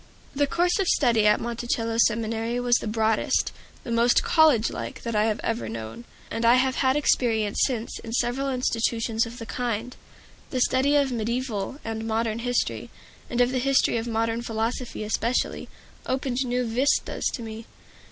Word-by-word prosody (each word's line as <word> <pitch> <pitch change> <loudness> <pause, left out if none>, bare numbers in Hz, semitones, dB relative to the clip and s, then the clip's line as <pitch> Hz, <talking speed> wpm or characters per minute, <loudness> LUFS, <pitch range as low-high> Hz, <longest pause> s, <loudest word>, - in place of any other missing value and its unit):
The 285 +1 +1
course 355 +6 +1
of 385 - +1
study 230 -9 +3
at 210 - +4
Monticello 230 -1 -2
Seminary 230 +1 +1
was 245 -1 +3
the - - -5
broadest, 220 0 +1 0.3
the 235 - -6
most 235 +1 +3
college 300 -9 +4
like, - - -6
that 230 -1 -3
I 210 0 +3
have 220 -1 0
ever 230 +1 -2
known; 110 - -7 0.3
and 230 - -2
I 235 +1 +6
have 260 0 +1
had 260 -1 +2
experience 225 -7 +1
since 235 -3 -4
in 225 - -8
several 245 +4 0
institutions 230 -2 0
of 235 +1 -10
the 230 - -7
kind. 240 0 -3 0.5
The 255 - -2
study 260 +3 +2
of 280 -2 +3
mediaeval 235 0 -2
and 225 0 -4
modern 225 0 -1
history, 245 +1 -1 0.4
and 245 0 +1
of 245 +1 +3
the 260 - 0
history 270 -2 +2
of 225 +1 -3
modern 230 0 -1
philosophy, 230 0 -3
especially, 230 +3 -1 0.4
opened 260 -1 -1
new 250 0 0
vistas 245 +5 +1
to 235 - -7
me. 225 0 -8
235 Hz, 170 wpm, -25 LUFS, 225-250 Hz, 0.5 s, I